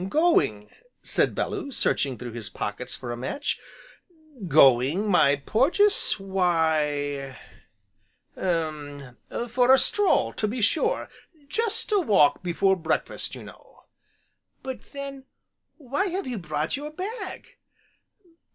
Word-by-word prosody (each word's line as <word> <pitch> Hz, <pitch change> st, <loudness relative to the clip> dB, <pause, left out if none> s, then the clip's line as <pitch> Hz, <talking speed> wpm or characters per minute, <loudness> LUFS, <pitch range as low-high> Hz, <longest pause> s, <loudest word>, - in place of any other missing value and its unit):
"Going," 250 Hz, -, +2 dB, 0.3 s
said -, -, +1 dB
Bellew, 280 Hz, -, -3 dB
searching 140 Hz, -, 0 dB
through 120 Hz, +2 st, -7 dB
his 115 Hz, -2 st, -7 dB
pockets 105 Hz, +4 st, -5 dB
for 120 Hz, -2 st, -7 dB
a -, -, -3 dB
match, 130 Hz, -, -3 dB, 0.9 s
"going, 140 Hz, -, +4 dB
my 145 Hz, -6 st, +5 dB
Porges, 280 Hz, -, +3 dB
why 155 Hz, -8 st, 0 dB, 1.0 s
er 150 Hz, -6 st, -3 dB, 0.3 s
for 245 Hz, +2 st, +3 dB
a 265 Hz, -, +8 dB
stroll, 410 Hz, +8 st, +2 dB
to 215 Hz, -, -1 dB
be 240 Hz, +4 st, -3 dB
sure, 320 Hz, -, +1 dB, 0.4 s
just 455 Hz, +6 st, 0 dB
a 415 Hz, -, +4 dB
walk 175 Hz, -, +3 dB
before 190 Hz, +2 st, +2 dB
breakfast, 160 Hz, -3 st, -2 dB
you -, -, -9 dB
know." -, -, -16 dB, 0.8 s
"But 260 Hz, -1 st, -6 dB
then 275 Hz, -1 st, -7 dB, 0.5 s
why 290 Hz, +7 st, -2 dB
have 375 Hz, +2 st, -3 dB
you 245 Hz, -4 st, -4 dB
brought 155 Hz, -2 st, -2 dB
your 290 Hz, +2 st, -6 dB
bag?" 380 Hz, +9 st, -7 dB
190 Hz, 115 wpm, -25 LUFS, -, 1.0 s, a